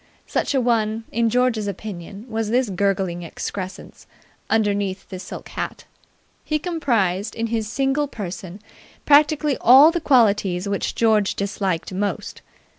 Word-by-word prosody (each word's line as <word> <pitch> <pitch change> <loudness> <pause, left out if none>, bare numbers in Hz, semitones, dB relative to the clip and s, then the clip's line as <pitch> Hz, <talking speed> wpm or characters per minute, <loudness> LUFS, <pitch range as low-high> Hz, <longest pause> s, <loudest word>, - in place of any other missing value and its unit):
Such - - -1
a - - +4
one, 225 -2 0
in 230 0 +1
George's 240 -3 +1
opinion, 200 +1 -7
was 225 -2 -2
this 245 -2 +1
gurgling 190 -2 0
excrescence 185 +3 -7 0.4
underneath 200 -3 0
the 185 -2 -7
silk - - -9
hat. - - -5 0.6
He 305 - 0
comprised 235 - -1
in 230 - -2
his 220 -2 -1
single 275 +2 0
person 190 -4 -7 0.4
practically 295 -1 +4
all 270 +7 +8
the 345 0 -2
qualities 205 - +3
which 200 -1 -2
George 215 -3 +2
disliked 195 -3 -2
most. 200 +2 -3
215 Hz, 130 wpm, -22 LUFS, 195-250 Hz, 0.6 s, all